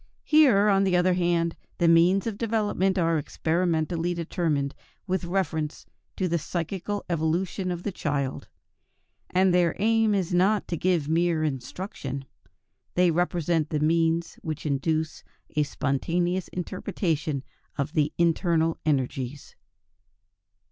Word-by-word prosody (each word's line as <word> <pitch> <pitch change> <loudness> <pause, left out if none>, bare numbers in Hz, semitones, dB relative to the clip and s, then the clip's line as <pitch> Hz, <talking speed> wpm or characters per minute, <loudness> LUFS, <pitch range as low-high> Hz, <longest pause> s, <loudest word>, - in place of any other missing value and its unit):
Here, 265 -10 +5
on 195 -1 +4
the 185 -2 +3
other 180 +1 +3
hand, 170 -2 +1 0.2
the 170 - +2
means 175 +4 +5
of 220 -2 -4
development 210 -4 0
are 165 -2 +2
experimentally 165 +2 0
determined 160 -4 -1 0.3
with 185 -2 -1
reference 170 -4 -2 0.3
to 185 - 0
the 170 -1 0
psychical 185 +5 -3
evolution 175 +3 -1
of 175 -1 -4
the 205 - -2
child; 140 -6 -2 0.8
and 185 0 +3
their 175 -2 +3
aim 220 0 +3
is 185 -3 -1
not 195 +4 +2
to 170 - -1
give 170 -3 +1
mere 165 0 +1
instruction; 140 - -4 0.7
they 180 -1 +4
represent 170 -2 0
the 150 - -1
means 165 +2 +1
which 155 -1 -5
induce 155 +2 -1 0.3
a 150 - +3
spontaneous 170 +6 -1
interpretation 160 - -2 0.3
of 140 +3 -2
the 150 -2 +2
internal 165 -1 +2
energies. 135 -2 -2
170 Hz, 125 wpm, -26 LUFS, 155-185 Hz, 0.8 s, Here